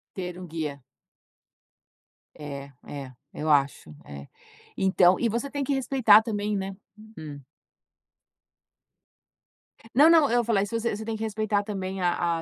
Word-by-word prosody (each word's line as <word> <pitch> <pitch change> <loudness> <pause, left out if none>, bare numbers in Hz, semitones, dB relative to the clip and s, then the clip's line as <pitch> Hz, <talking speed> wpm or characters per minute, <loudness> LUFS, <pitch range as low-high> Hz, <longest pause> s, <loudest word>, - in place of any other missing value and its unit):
Ter 180 -1 -5
um 180 - -8
guia. 150 -4 -5 1.5
É, 140 -2 -8
é, 140 -3 -8 0.2
eu 155 +1 -3
acho, 140 - +1
é 70 -1 -9 0.5
Então, 185 -1 +4
e 235 - +2
você 235 +6 -3
tem 285 -1 -3
que 280 - 0
respeitar 245 -5 +5
também, 210 -2 -2
né 195 0 -4 0.4
Hum. 145 -3 -8 2.5
Não, 295 +5 +7
não. 320 -6 +5
Eu 240 0 +3
falei 210 -4 +1
isso 230 +3 -3
você 230 -2 -1
você 220 - -7
tem 225 0 -3
que 220 - -7
respeitar 215 -1 -1
também 195 -2 -5
a 175 -1 0
195 Hz, 140 wpm, -26 LUFS, 155-225 Hz, 2.5 s, Não